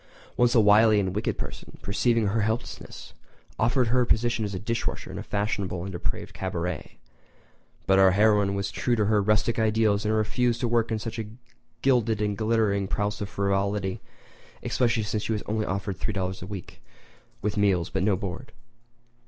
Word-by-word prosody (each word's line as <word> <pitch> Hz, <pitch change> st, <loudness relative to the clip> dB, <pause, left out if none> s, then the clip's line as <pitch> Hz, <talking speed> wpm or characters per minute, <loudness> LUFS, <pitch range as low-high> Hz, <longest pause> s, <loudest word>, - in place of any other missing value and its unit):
Once 120 Hz, 0 st, +3 dB
a -, -, +7 dB
wily 105 Hz, 0 st, +6 dB
and 95 Hz, -2 st, -1 dB
wicked 105 Hz, -, -1 dB
person, -, -, -8 dB
perceiving 115 Hz, +3 st, +1 dB
her 105 Hz, +3 st, +1 dB
helplessness, 110 Hz, +3 st, -4 dB, 0.5 s
offered 120 Hz, +1 st, +2 dB
her 125 Hz, +2 st, +3 dB
a -, -, +2 dB
position 120 Hz, 0 st, +1 dB
as 100 Hz, -1 st, -3 dB
dish 115 Hz, +4 st, -2 dB
washer -, -, -5 dB
in -, -, -6 dB
a -, -, -4 dB
fashionable 100 Hz, -4 st, -2 dB
and 95 Hz, -, -5 dB
depraved 85 Hz, -, -4 dB
cabaret; 90 Hz, -3 st, -4 dB, 0.9 s
but 95 Hz, 0 st, +4 dB
our 95 Hz, 0 st, +7 dB
heroine 100 Hz, 0 st, +3 dB
was 100 Hz, 0 st, -2 dB
true 120 Hz, -, 0 dB
to 110 Hz, -2 st, +1 dB
her 105 Hz, 0 st, +3 dB
rustic 105 Hz, +3 st, +1 dB
ideals 110 Hz, -2 st, +2 dB
and 110 Hz, 0 st, +1 dB
refused 115 Hz, +2 st, +1 dB
to 125 Hz, -, 0 dB
work 115 Hz, -1 st, +1 dB
in 110 Hz, -, +1 dB
such 115 Hz, +1 st, -5 dB
a 110 Hz, -, -4 dB, 0.6 s
gilded 120 Hz, -5 st, +2 dB
and 105 Hz, -1 st, 0 dB
glittering 110 Hz, -3 st, +1 dB
palace 105 Hz, +2 st, -2 dB
of 100 Hz, -, -3 dB
frivolity—especially 100 Hz, +4 st, -2 dB
since 105 Hz, 0 st, -2 dB
she 110 Hz, -, -1 dB
was 105 Hz, -, -3 dB
offered 100 Hz, -2 st, -2 dB
only 105 Hz, -3 st, -3 dB
$3.00 95 Hz, -, -9 dB
per -, -, -7 dB
week 100 Hz, -3 st, -8 dB, 0.6 s
with 105 Hz, 0 st, -1 dB
meals 95 Hz, -5 st, +1 dB
but -, -, -1 dB
no 100 Hz, 0 st, +3 dB
board. 100 Hz, +5 st, -6 dB
105 Hz, 175 wpm, -26 LUFS, 100-115 Hz, 0.9 s, a